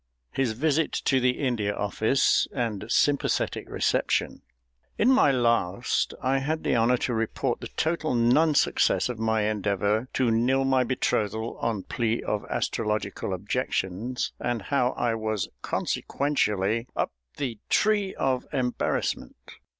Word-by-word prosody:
His 130 Hz, -5 st, 0 dB
visit 155 Hz, +5 st, +1 dB
to 135 Hz, -, +1 dB
the 125 Hz, 0 st, +1 dB
India 115 Hz, -7 st, -1 dB
Office 110 Hz, +6 st, +2 dB
and 110 Hz, -5 st, -2 dB
sympathetic 140 Hz, +3 st, +1 dB
reception._ -, -, 0 dB, 0.6 s
In 250 Hz, -, +4 dB
my 255 Hz, -, +5 dB
last 115 Hz, -4 st, +1 dB
I 135 Hz, +1 st, +2 dB
had 155 Hz, +4 st, -2 dB
the -, -, +1 dB
honour 120 Hz, +2 st, +3 dB
to 125 Hz, -, -1 dB
report 115 Hz, -1 st, -1 dB
the -, -, -5 dB
total 160 Hz, -4 st, -1 dB
non 135 Hz, +7 st, +4 dB
success -, -, +2 dB
of 120 Hz, -3 st, -5 dB
my 110 Hz, -1 st, +1 dB
endeavour 105 Hz, +2 st, 0 dB
to 125 Hz, -3 st, +2 dB
nill 130 Hz, +4 st, +2 dB
my 130 Hz, -1 st, +3 dB
betrothal 110 Hz, -3 st, -1 dB
on 110 Hz, -5 st, -1 dB
plea 115 Hz, -1 st, -1 dB
of 105 Hz, -, -2 dB
astrological 105 Hz, -3 st, -2 dB
objections, 100 Hz, +3 st, -2 dB
and 120 Hz, -4 st, -2 dB
how 130 Hz, 0 st, +1 dB
I 120 Hz, -1 st, 0 dB
was 110 Hz, -4 st, -2 dB
consequentially 115 Hz, -5 st, 0 dB
up -, -, -1 dB, 0.3 s
the 120 Hz, -6 st, -3 dB
tree 205 Hz, -3 st, +2 dB
of 130 Hz, -2 st, -1 dB
embarrassment. 125 Hz, -, -1 dB
120 Hz, 135 wpm, -26 LUFS, 110-135 Hz, 0.6 s, my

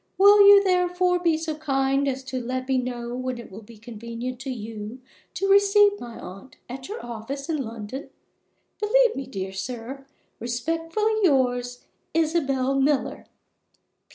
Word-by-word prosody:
Will 405 Hz, +1 st, +7 dB
you, 405 Hz, 0 st, +9 dB
therefore, 360 Hz, -1 st, +2 dB
be 335 Hz, -3 st, +2 dB
so 320 Hz, 0 st, -3 dB
kind 275 Hz, -2 st, 0 dB
as 265 Hz, 0 st, -2 dB
to 260 Hz, -1 st, -4 dB
let 255 Hz, +2 st, -4 dB
me 265 Hz, -1 st, +2 dB
know 245 Hz, -1 st, -4 dB
when 255 Hz, 0 st, -3 dB
it 235 Hz, -, -10 dB
will 200 Hz, +4 st, -9 dB
be 225 Hz, +1 st, -15 dB
convenient 235 Hz, +2 st, -7 dB
to 270 Hz, 0 st, -6 dB
you 220 Hz, -1 st, -6 dB, 0.4 s
to 390 Hz, -, -1 dB
receive 405 Hz, +1 st, +5 dB
my 235 Hz, -1 st, -9 dB
aunt 195 Hz, +8 st, -11 dB
at 260 Hz, +1 st, -8 dB
your 430 Hz, -, -6 dB
office 240 Hz, +4 st, -6 dB
in 320 Hz, -, 0 dB
London? 230 Hz, +4 st, -7 dB, 0.7 s
Believe 480 Hz, +2 st, +3 dB
me, 270 Hz, -, -5 dB
dear 190 Hz, -6 st, -5 dB
sir, 245 Hz, +7 st, -6 dB, 0.3 s
respectfully 330 Hz, -, -1 dB
yours, 245 Hz, -7 st, +1 dB, 0.3 s
ISABEL 275 Hz, -5 st, +1 dB
MILLER. 275 Hz, -1 st, 0 dB
265 Hz, 150 wpm, -25 LUFS, 240-330 Hz, 0.7 s, you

